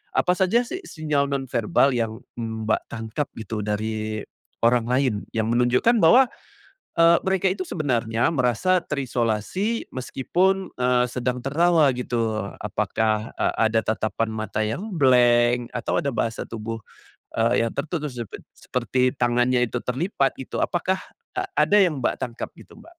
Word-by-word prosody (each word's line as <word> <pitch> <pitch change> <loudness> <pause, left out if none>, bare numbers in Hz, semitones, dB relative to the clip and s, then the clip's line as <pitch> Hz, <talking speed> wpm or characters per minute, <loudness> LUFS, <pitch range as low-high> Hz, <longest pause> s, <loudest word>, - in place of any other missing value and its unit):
Apa 180 - +3
saja 200 +6 +2
sih, 370 +9 -5
sinyal 150 - -1
nonverbal 135 -1 +1
yang 115 -1 -2 0.2
Mbak 110 -1 -1
tangkap, 115 +5 -3
gitu, 110 0 -4
dari 110 0 -2 0.4
orang 120 0 +4
lain, 130 -1 +2 0.2
yang 110 +1 0
menunjukkan 125 - +3
bahwa, 250 +11 +7 0.7
eee, 170 0 +6
mereka 190 0 +2
itu 185 -1 -3
sebenarnya 120 -5 0
merasa 150 - +2
terisolasi, 135 - -1
meskipun, 185 +9 0
eee, 125 0 +3
sedang 125 0 -2
tertawa 160 +2 +3
gitu. 115 -3 -1 0.2
Apakah, 110 +1 -1
e - - -1
ada 110 0 +3
tatapan 110 0 -1
mata 110 0 -3
yang 185 - -3
blank, 120 -3 +4
atau 125 - -1
ada 140 - -1
bahasa 115 0 -2
tubuh, 115 0 -5 0.6
eee, 115 +1 +3
yang - - -5
tertutup 155 -2 -3
sepe 120 -4 -6 0.2
seperti 125 +1 0
tangannya 120 +1 +2
itu 120 +1 -4
terlipat 135 +2 0
gitu. 130 - -6
Apakah, 185 +1 0 0.4
e - - +2 0.2
ada 205 - +4
yang 160 -7 +2
Mbak - - 0
tangkap, 120 -2 -4
gitu - - -15
Mbak? - - -16
125 Hz, 140 wpm, -24 LUFS, 115-155 Hz, 0.7 s, bahwa